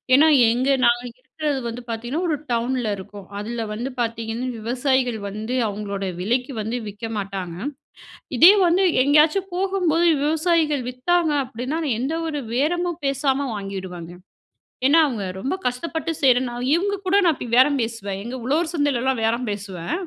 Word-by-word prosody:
ஏன்னா, 300 +4 +6 0.2
எங்க 250 +3 0 0.2
நாங்க 240 +1 +3 0.2
இருக்கிறது 290 +1 -3
வந்து 235 +1 -5
பார்த்தீங்கன்னா 240 +8 -3
ஒரு 315 - +1 0.2
டவுன்ல 240 -1 0
இருக்கோம். 200 0 -10
அதில 225 +2 -4
வந்து 240 +5 -4
பார்த்தீங்கன்னா, 230 +1 -3
விவசாயிகள் 250 +1 0
வந்து 215 +5 -4
அவுங்களோட 200 -1 -4 0.2
விலைக்கி 245 +7 -1
வந்து 225 +4 -3
விக்க 210 +3 -7
மாட்டாங்க. 190 -4 -5 0.8
இதே 340 +8 +10
வந்து 355 +3 +3 0.2
எங்கேயாச்சும் 305 +7 +3
போகும்போது 360 -3 +1 0.2
விவசாயிகள் 310 -3 +1
வித்தாங்க 320 +6 +1
அப்பிடின்னா, 255 +6 -4
நான் 235 -6 0
எந்த 270 +6 -1
ஒரு 295 -2 -3
பேரமும் 345 +5 0
பேசாம 275 0 0
வாங்கிடுவேங்க. 190 -4 -6 0.8
ஏன்னா, 305 +4 +6
அவுங்க 230 -9 -3
ரொம்ப 265 - -2
கஷ்டப்பட்டு 320 +6 -2
செய்யிறனா 250 -2 +3 0.2
இவுங்க 405 +4 0
கூட 370 +1 +2
நான் 335 -3 +4
இப்பிடி 245 - -7
பேரம் 280 +3 +5
பேசுவேன். 205 -4 -4
எங்க 240 +3 -6
உழவர் 315 +5 +1
சந்தையிலலாம் 265 -5 0
பேரம் 235 +2 0
பேசுவேன். 195 -4 -5
250 Hz, 145 wpm, -22 LUFS, 225-300 Hz, 0.8 s, இதே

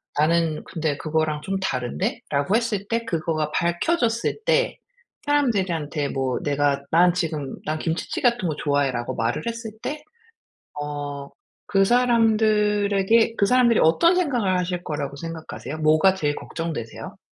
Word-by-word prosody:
'나는 160 +1 +1
근데 155 -3 -2
그거랑 155 -1 -1
좀 195 +5 -3
다른데?'라고 150 - -1
했을 215 -4 -1
때 230 0 -1
그거가 155 -5 -1
밝혀졌을 230 - 0
때 - - +2 0.5
사람들한테 185 - 0
뭐 130 -2 -1
내가 145 -1 +1
난 175 +2 +5
지금 155 -6 -2
"난 155 +1 -2
김치찌개 165 0 -3
같은 235 -6 -3
거 155 - -2
좋아해."라고 140 -5 0
말을 115 +1 -1
했을 230 -1 -4
때 300 +1 -5 0.8
어 145 -1 -5 0.4
그 195 -1 +4
사람들에게 220 -2 +3
그 200 - +3
사람들이 240 +1 +4
어떤 335 - +4
생각을 240 - +1
하실 180 0 -2
거라고 145 -3 -4
생각하세요? 160 -2 -7
뭐가 155 +5 +4
제일 150 -6 -1
걱정되세요? 160 -9 -6
170 Hz, 310 characters per minute, -23 LUFS, 150-225 Hz, 0.8 s, 난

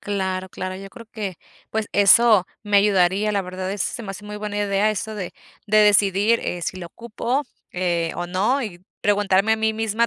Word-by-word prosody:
Claro, 190 -2 -3
claro, 185 0 -5
yo 195 +1 -10
creo 230 0 -12
que, 200 -6 -5 0.3
pues, 220 -1 -2
eso 205 0 +6 0.2
me 205 -1 +1
ayudaría, 200 +1 +3
la 200 - +1
verdad, 185 0 -5
eso 205 - -2
se 240 - -6
me 195 - -6
hace 195 +2 -8
muy 210 0 -7
buena 210 0 -4
idea, 205 +1 +1
eso 215 +1 -4
de 190 -4 -5 0.3
de 215 0 +3
decidir, 205 +1 +4
eh, 175 - -3
si 170 - -4
lo 175 -2 -7
ocupo, 235 - -3 0.3
eh, 175 -2 -1
o 175 - -4
no, 210 +10 0
y 180 -6 -7 0.2
preguntarme 205 0 +2
a - - +2
mí 220 0 +1
misma 225 +1 0
205 Hz, 205 wpm, -22 LUFS, 185-215 Hz, 0.3 s, eso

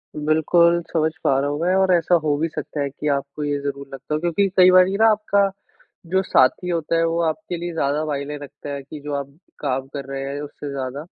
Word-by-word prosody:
बिल्कुल, 170 +3 +3
समझ 160 -1 +2
पा 135 -1 +3
रहा 140 +1 0
हूँ 145 +1 -3
मैं 180 +2 +2
और 190 -1 +3
ऐसा 175 +1 +3
हो 150 -2 +2
भी 160 - 0
सकता 150 -1 -5
है 140 - -1
कि 145 +2 -6
आपको 140 +2 -5
ये 145 0 -1
ज़रूर 140 0 -5
लगता 135 +3 -6
हो, 150 - +1
क्योंकि 175 +4 +1
कई 185 0 +8
बारी 185 +1 +5
ना 225 +1 +5
आपका 205 -2 +2 0.6
जो 190 0 +3
साथी 180 +2 +2
होता 165 -1 0
है 165 - +2
वो 165 +1 0
आपके 175 +2 -3
लिए 175 0 -5
ज़्यादा 150 0 0
मायने 145 0 -3
रखता 145 +1 -10
है 140 - -5
कि, 150 +2 -9
जो 145 0 -5
आप 140 +1 -6 0.2
काम 135 -2 -2
कर 140 -1 -5
रहे 135 0 -4
हैं 140 +1 -4
उससे 145 0 -7
ज़्यादा, 135 +1 -4
150 Hz, 230 wpm, -22 LUFS, 140-170 Hz, 0.6 s, कई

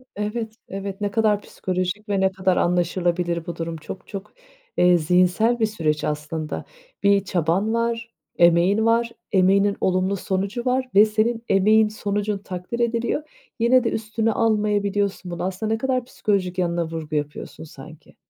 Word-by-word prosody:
Evet, 215 +2 -3
evet. 195 +1 -6
Ne 205 -1 -1
kadar 210 -1 +2
psikolojik 185 +3 -3
ve 200 -1 +1
ne 190 0 +3
kadar 185 -1 +1
anlaşılabilir 175 -1 0
bu 170 - -5
durum. 165 0 -4
Çok 160 +4 -9
çok, 200 -1 -8 0.4
eee, 180 0 +5
zihinsel 180 +8 +2
bir 220 - +3
süreç 155 -8 -1
aslında. 150 +1 -3 0.4
Bir 200 -1 +4
çaban 185 +4 0
var, 230 0 -1 0.3
emeğin 175 +6 +4
var, 230 +1 +2 0.2
emeğinin 195 +1 +3
olumlu 185 +1 +1
sonucu 195 +5 -2
var 255 +1 +1
ve 205 +2 +8
senin 225 +2 0
emeğin, 215 +3 +5
sonucun 205 0 -2
takdir 190 +3 -6
ediliyor. 235 +5 -1 0.3
Yine 245 +2 +4
de 230 - +1
üstüne 220 +1 -1
almayabiliyorsun 205 -4 0
bunu. 175 - -4
Aslında 190 +4 -2
ne - - 0
kadar 255 +1 -1
psikolojik 195 -6 -1
yanına 170 -2 0
vurgu 160 -1 -5
yapıyorsun 150 +1 -4
sanki. 155 0 -13
200 Hz, 150 wpm, -23 LUFS, 180-220 Hz, 0.4 s, ve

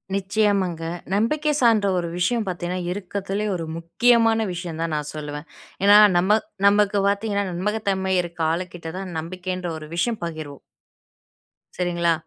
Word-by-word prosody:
நிச்சயமாங்க. 195 -3 +1 0.3
நம்பிக்கை 300 +9 +1
சார்ந்த 225 -4 +4
ஒரு 170 - -3
விஷயம் 220 +5 +1
பார்த்தீங்கன்னா, 180 0 -3
இருக்கதுலே 200 +2 -3
ஒரு 165 -2 -4
முக்கியமான 225 +6 +3
விஷயம் 170 -2 -6
தான் 165 -1 -1
நான் 150 -1 -3
சொல்லுவேன். 150 0 -6 0.4
ஏன்னா 205 +1 +8 0.2
நம 190 +5 +4 0.3
நமக்கு 205 0 +3
பார்த்தீங்கன்னா, 200 0 0
நம்பகத்தன்மை 190 0 -1
இருக்க 170 -1 -7
ஆளுகிட்ட 170 -1 -4
தான், 190 -2 -6
நம்பிக்கைன்ற 180 +2 -5
ஒரு 155 -1 -9
விஷயம் 220 +5 -1
பகிர்வோம். 155 -4 -7 1.2
சரிங்களா? 175 -1 +1
185 Hz, 125 wpm, -23 LUFS, 170-205 Hz, 1.2 s, ஏன்னா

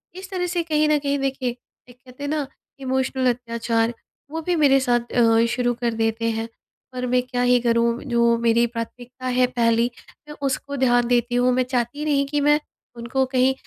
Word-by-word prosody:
इस 375 +1 -9
तरह 360 -1 -1
से 345 - +1
कहीं 305 -2 +1
न 305 - +4
कहीं 280 0 -1
देखिए 265 -3 -2 0.3
एक 245 - -15
कहते 255 +2 -13
हैं 285 - -2
न 300 -2 -1 0.3
इमोशनल 260 -1 0
अत्याचार 230 -1 -1 0.4
वो 325 +1 -3
भी 355 +2 0
मेरे 280 -4 +4
साथ 240 -2 0
अ, 230 -1 +4
शुरू 245 -1 +1
कर 235 -1 0
देते 225 +1 0
हैं। 225 +1 -4 0.4
पर 250 0 -3
मैं 250 0 +3
क्या 250 -1 -3
ही 245 0 +4
करूँ 235 0 +1
जो 235 -1 +3
मेरी 235 0 +3
प्राथमिकता 245 +2 -7
है 255 - +5
पहली 230 0 +2 0.4
मैं 295 - -9
उसको 280 +1 -3
ध्यान 245 -2 +3
देती 245 0 +1
हूँ। 245 +1 +3
मैं 255 +1 +2
चाहती 250 +3 -2
नहीं 280 -2 +2
कि 295 +1 -1
मैं 295 +1 +4 0.4
उनको 240 +3 -1
कहीं 260 0 +3
250 Hz, 195 wpm, -22 LUFS, 235-275 Hz, 0.4 s, है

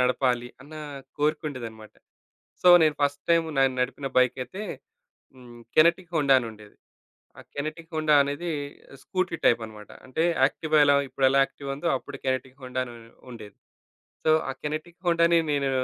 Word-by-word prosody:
నడపాలి 125 -1 +1
అన్న 150 +3 -13 0.4
కోరికుండేదనమాట. 130 -8 -3 0.7
సో, 180 - +3 0.2
నేను 155 -2 +2
ఫస్ట్ 145 0 0
టైము 165 -1 +3
నేను 135 -1 +3
న - - -1
నడిపిన 135 +2 -2
బైకైతే 130 - -1 0.7
హ్మ్, 120 -2 -14
కెనెటిక్ 170 +2 +4
హోండా 140 -3 +4
అనుండేది. 110 -3 -10 0.6
ఆ - - -10
కెనెటిక్ 155 +4 -5
హోండా 155 -1 +2
అనేది 145 +5 -4 0.5
స్కూటీ 185 -2 -2
టైపన్నమాట. 110 -3 0 0.2
అంటే 130 +5 -1 0.2
యాక్టివా 155 +3 +1
ఎలా 145 0 +5
ఇప్పుడెలా 135 0 +3
యాక్టివా 140 0 -6
ఉందో, 160 +5 -3
అప్పుడు 130 +2 -10
కెనెటిక్ 130 +1 -2
హోండా 130 0 -4
అనుం 120 -1 -10 0.3
ఉండేది. 105 -4 -11 0.7
సో, 155 - +5
ఆ 135 - -4
కెనెటిక్ 155 +4 -5
హోండాని 170 0 +4
నేను 140 -1 0
140 Hz, 140 wpm, -26 LUFS, 125-155 Hz, 0.7 s, ఎలా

